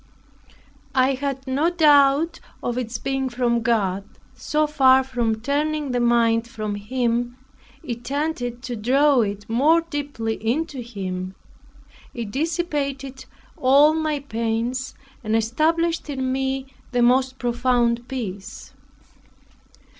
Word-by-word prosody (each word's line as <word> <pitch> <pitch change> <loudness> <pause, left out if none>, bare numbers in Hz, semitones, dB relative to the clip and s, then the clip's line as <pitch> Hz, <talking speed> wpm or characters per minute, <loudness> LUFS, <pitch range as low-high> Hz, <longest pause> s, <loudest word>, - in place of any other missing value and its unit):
I 260 +1 +4
had 270 0 -3
no 280 +5 +1
doubt 300 -1 +4 0.2
of 240 - -1
its 240 -2 -3
being 270 +2 -2
from 240 -1 0
God; 200 -5 +1 0.3
so 305 0 0
far 265 -3 +5
from 240 -4 -1
turning 295 +2 -1
the 245 - 0
mind 235 -1 +3
from 215 -3 -4
Him, 240 +3 -1 0.5
it 235 -1 -5
tended 265 -4 -3
to 245 -2 -4
draw 265 +4 +3
it 205 -1 -3
more 290 +9 +4
deeply 285 -9 -4
into 270 +3 -1
Him. 190 -5 -5 0.8
It 230 -4 -5
dissipated 280 -3 -2 0.3
all 280 +4 +5
my 310 -1 0
pains, 230 +1 -2 0.3
and 215 0 0
established 315 +9 +1
me 265 -1 -1
in 265 - -9 0.3
the 245 -1 +3
most 260 +2 +3
profound 240 -1 +1
peace. 205 -7 -6
255 Hz, 115 wpm, -23 LUFS, 235-285 Hz, 0.8 s, far